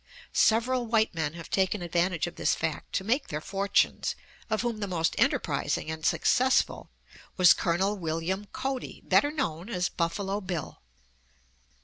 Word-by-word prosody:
Several 240 Hz, +2 st, +3 dB
white 220 Hz, -2 st, +2 dB
men 160 Hz, -3 st, -2 dB
have 165 Hz, -1 st, -10 dB
taken 190 Hz, 0 st, +1 dB
advantage 175 Hz, 0 st, 0 dB
of 175 Hz, -, -6 dB
this -, -, +1 dB
fact 160 Hz, -2 st, -3 dB
to -, -, 0 dB
make 250 Hz, +8 st, 0 dB
their 150 Hz, -, -3 dB
fortunes, 200 Hz, +6 st, 0 dB, 0.3 s
of 220 Hz, +1 st, 0 dB
whom 235 Hz, -3 st, -2 dB
the 205 Hz, -, -2 dB
most 165 Hz, -3 st, 0 dB
enterprising 160 Hz, -, 0 dB
and 160 Hz, 0 st, -6 dB
successful 255 Hz, +9 st, +2 dB, 0.5 s
was 180 Hz, -2 st, +8 dB
Col. 190 Hz, +4 st, 0 dB
William 170 Hz, +3 st, -2 dB
Cody, 265 Hz, -1 st, -4 dB
better 290 Hz, -, +4 dB
known 205 Hz, -, -3 dB
as 180 Hz, -4 st, 0 dB
"Buffalo 195 Hz, +4 st, -2 dB
Bill." 180 Hz, -4 st, -5 dB
190 Hz, 145 wpm, -28 LUFS, 170-220 Hz, 0.5 s, was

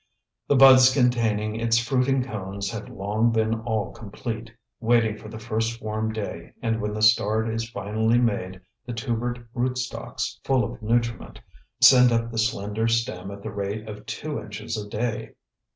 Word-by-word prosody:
The 145 Hz, -, +3 dB
buds 130 Hz, -1 st, +8 dB
containing 115 Hz, -4 st, +1 dB
its 115 Hz, 0 st, +2 dB
fruiting 130 Hz, +2 st, +1 dB
cones 100 Hz, -4 st, -5 dB
have 110 Hz, -2 st, -6 dB
long 105 Hz, +4 st, 0 dB
been 110 Hz, 0 st, +1 dB
all 110 Hz, -3 st, -2 dB
complete, 110 Hz, +1 st, -6 dB, 0.3 s
waiting 115 Hz, -2 st, +2 dB
for 110 Hz, 0 st, -11 dB
the 110 Hz, -, -8 dB
first 115 Hz, +1 st, -2 dB
warm 110 Hz, 0 st, -2 dB
day, 100 Hz, -6 st, -6 dB
and 115 Hz, -1 st, -1 dB
when 105 Hz, 0 st, -3 dB
the 110 Hz, -, -2 dB
start 110 Hz, +1 st, +4 dB
is 115 Hz, 0 st, -3 dB
finally 110 Hz, +2 st, 0 dB
made 95 Hz, -6 st, -1 dB, 0.2 s
the 125 Hz, -, -6 dB
tubered 120 Hz, +1 st, -3 dB
rootstocks, 125 Hz, 0 st, -3 dB
full 130 Hz, -2 st, +2 dB
of -, -, -6 dB
nutriment, 115 Hz, 0 st, -1 dB, 0.4 s
send 125 Hz, -2 st, +8 dB
up 115 Hz, 0 st, 0 dB
the 115 Hz, -, -3 dB
slender 110 Hz, -1 st, 0 dB
stem 115 Hz, -5 st, -1 dB
at 100 Hz, 0 st, -9 dB
the 110 Hz, -, -5 dB
rate 105 Hz, +1 st, -4 dB
of 105 Hz, -1 st, -9 dB
two 150 Hz, -5 st, -4 dB
inches 105 Hz, +1 st, -6 dB
a 105 Hz, -1 st, -5 dB
day. 110 Hz, +1 st, -3 dB
115 Hz, 165 wpm, -25 LUFS, 105-120 Hz, 0.4 s, buds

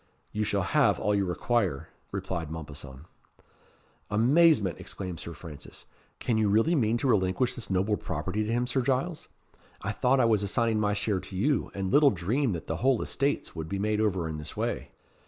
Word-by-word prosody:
"You 105 Hz, -, -1 dB
shall 100 Hz, -2 st, 0 dB
have 145 Hz, +9 st, +3 dB
all 105 Hz, -, +1 dB
you 100 Hz, -1 st, +2 dB
require," 90 Hz, -, -1 dB, 0.2 s
replied 95 Hz, -5 st, -3 dB
Mompesson. 75 Hz, -3 st, -8 dB, 1.0 s
"Amazement!" 120 Hz, -, +4 dB
exclaimed 90 Hz, -4 st, -5 dB
Sir 85 Hz, -, -6 dB
Francis. 80 Hz, -5 st, -10 dB, 0.3 s
"Can 115 Hz, -2 st, 0 dB
you 105 Hz, -2 st, +2 dB
really 115 Hz, +11 st, +3 dB
mean 120 Hz, -7 st, +2 dB
to 135 Hz, -, -1 dB
relinquish 105 Hz, +2 st, +2 dB
this 120 Hz, -, -6 dB
noble 95 Hz, +3 st, +1 dB
property 105 Hz, +3 st, -3 dB
to 105 Hz, -, -2 dB
him, 120 Hz, +1 st, +1 dB
Sir 130 Hz, +2 st, 0 dB
Giles? 135 Hz, +6 st, -1 dB, 0.6 s
I -, -, -1 dB
thought 130 Hz, +2 st, +2 dB
I 125 Hz, -, +5 dB
was 110 Hz, -3 st, +3 dB
assigning 110 Hz, +2 st, +1 dB
my 105 Hz, -1 st, +1 dB
share 100 Hz, -1 st, 0 dB
to 95 Hz, -, -10 dB
you, 135 Hz, +10 st, +1 dB
and 95 Hz, -1 st, -2 dB
little 145 Hz, 0 st, +6 dB
dreamed 110 Hz, +4 st, 0 dB
that 85 Hz, -, -6 dB
the 80 Hz, -, -3 dB
whole 130 Hz, +3 st, +2 dB
estates 140 Hz, -6 st, -1 dB
would 80 Hz, -1 st, -5 dB
be 100 Hz, -, -2 dB
made 105 Hz, +2 st, 0 dB
over 95 Hz, -6 st, 0 dB
in 80 Hz, -1 st, -4 dB
this 75 Hz, -, -8 dB
way." -, -, -2 dB
105 Hz, 190 wpm, -28 LUFS, 90-125 Hz, 1.0 s, little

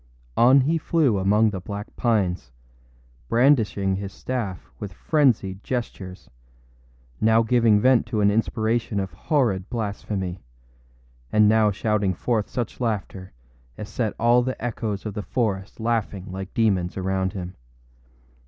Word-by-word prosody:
On 130 Hz, +4 st, +6 dB
he 160 Hz, +5 st, +1 dB
flew 145 Hz, -, +2 dB
among 105 Hz, +3 st, +3 dB
the 95 Hz, -, -4 dB
black 100 Hz, +3 st, -7 dB
pines, 95 Hz, -, 0 dB, 0.8 s
brandishing 115 Hz, -7 st, +3 dB
his 100 Hz, 0 st, -5 dB
staff 110 Hz, -9 st, -4 dB
with 100 Hz, -3 st, -6 dB
frenzied 110 Hz, -, +1 dB
gestures, 100 Hz, -7 st, -5 dB, 0.9 s
now 110 Hz, +1 st, +4 dB
giving 115 Hz, -2 st, +4 dB
vent 125 Hz, 0 st, +3 dB
to 110 Hz, -2 st, -2 dB
an 100 Hz, 0 st, +4 dB
inspiration 110 Hz, 0 st, 0 dB
of 95 Hz, -1 st, -4 dB
horrid 115 Hz, -, 0 dB
blasphemy, 100 Hz, -4 st, -4 dB, 0.9 s
and 105 Hz, -1 st, +5 dB
now 110 Hz, 0 st, +4 dB
shouting 100 Hz, -2 st, 0 dB
forth 110 Hz, +1 st, -1 dB
such 120 Hz, 0 st, -4 dB
laughter 100 Hz, -5 st, -3 dB, 0.5 s
as 105 Hz, -, -7 dB
set 110 Hz, -4 st, -2 dB
all 120 Hz, +2 st, +4 dB
the 130 Hz, +1 st, -3 dB
echoes 110 Hz, -4 st, -3 dB
of 105 Hz, -, -4 dB
the 105 Hz, -, -4 dB
forest 100 Hz, -4 st, -2 dB
laughing 110 Hz, -4 st, -1 dB
like 95 Hz, +1 st, -6 dB
demons 95 Hz, -6 st, +1 dB
around 95 Hz, 0 st, -1 dB
him. 90 Hz, -2 st, -6 dB
105 Hz, 135 wpm, -24 LUFS, 95-120 Hz, 0.9 s, On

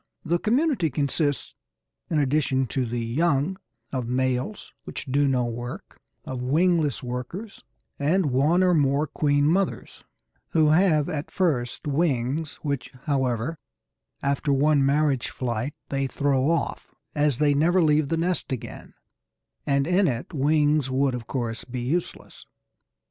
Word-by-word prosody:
The 170 Hz, +1 st, +1 dB
community 245 Hz, -, +1 dB
consists, 145 Hz, 0 st, -1 dB, 0.6 s
in 160 Hz, -, 0 dB
addition 135 Hz, -2 st, +1 dB
to 130 Hz, -3 st, -1 dB
the 120 Hz, 0 st, -3 dB
young, 145 Hz, +7 st, +1 dB, 0.3 s
of 130 Hz, -3 st, -3 dB
males, 130 Hz, +9 st, -2 dB
which -, -, -6 dB
do 140 Hz, +1 st, +2 dB
no 125 Hz, -2 st, +1 dB
work, 120 Hz, +1 st, -7 dB, 0.2 s
of 130 Hz, -1 st, -5 dB
wingless 155 Hz, +1 st, +2 dB
workers, 125 Hz, -, -6 dB, 0.4 s
and 155 Hz, +1 st, +2 dB
one 150 Hz, +8 st, +3 dB
or 180 Hz, -1 st, +4 dB
more 145 Hz, -1 st, +2 dB
queen 145 Hz, 0 st, +1 dB
mothers, 185 Hz, +5 st, -1 dB, 0.5 s
who 155 Hz, -2 st, +4 dB
have 155 Hz, -2 st, +4 dB
at 150 Hz, 0 st, -4 dB
first 140 Hz, -10 st, -1 dB
wings, 145 Hz, -1 st, 0 dB
which, 140 Hz, -5 st, -3 dB
however, 135 Hz, +1 st, -1 dB, 0.6 s
after 140 Hz, +1 st, 0 dB
one 145 Hz, +1 st, +3 dB
marriage 140 Hz, -2 st, +2 dB
flight, 125 Hz, +3 st, -3 dB
they 135 Hz, -1 st, -1 dB
throw 140 Hz, 0 st, +1 dB
off, 165 Hz, -, -2 dB, 0.2 s
as 145 Hz, -4 st, +1 dB
they 145 Hz, 0 st, +3 dB
never 165 Hz, +6 st, +3 dB
leave 150 Hz, -3 st, +3 dB
the 165 Hz, -, 0 dB
nest 175 Hz, -2 st, -1 dB
again, 130 Hz, -, -7 dB, 0.7 s
and 140 Hz, -1 st, +2 dB
in 180 Hz, +2 st, +3 dB
it 130 Hz, +5 st, -3 dB
wings 150 Hz, -1 st, +2 dB
would 135 Hz, 0 st, +1 dB
of 120 Hz, -3 st, -5 dB
course 115 Hz, -4 st, -3 dB
be 125 Hz, 0 st, -5 dB
useless. 160 Hz, +8 st, -4 dB
145 Hz, 140 wpm, -25 LUFS, 130-160 Hz, 0.7 s, or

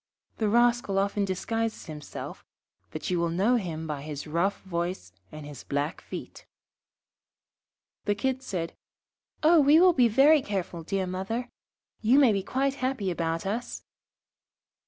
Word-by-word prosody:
The 215 Hz, -2 st, +1 dB
rascal 240 Hz, -3 st, +3 dB
often 200 Hz, +1 st, +1 dB
disguises 225 Hz, +4 st, -2 dB
himself, 150 Hz, -3 st, -8 dB, 0.5 s
but -, -, -5 dB
you 175 Hz, -, +1 dB
will 170 Hz, 0 st, +1 dB
know 200 Hz, +9 st, +2 dB
him 165 Hz, -6 st, -4 dB
by 150 Hz, -3 st, -4 dB
his 145 Hz, -1 st, -6 dB
rough 170 Hz, +6 st, 0 dB
voice 170 Hz, -, -3 dB, 0.2 s
and 155 Hz, -1 st, -9 dB
his 145 Hz, -3 st, -9 dB
black 145 Hz, +3 st, -2 dB
feet.' -, -, -9 dB, 1.6 s
The 205 Hz, -, +1 dB
Kids 260 Hz, +4 st, -2 dB
said, 170 Hz, -4 st, -3 dB, 0.7 s
'Oh, 325 Hz, +2 st, +6 dB
we 295 Hz, +2 st, +6 dB
will 365 Hz, 0 st, +6 dB
be 250 Hz, -6 st, +5 dB
very 275 Hz, +7 st, +5 dB
careful, 190 Hz, -6 st, -4 dB
dear 190 Hz, +3 st, -1 dB
mother. 195 Hz, +7 st, -3 dB, 0.5 s
You 235 Hz, +5 st, +4 dB
may 270 Hz, -5 st, +6 dB
be 195 Hz, -, 0 dB
quite 270 Hz, +6 st, 0 dB
happy 255 Hz, -8 st, -1 dB
about 165 Hz, 0 st, -2 dB
us.' 225 Hz, +5 st, -3 dB
195 Hz, 145 wpm, -27 LUFS, 170-245 Hz, 1.6 s, Oh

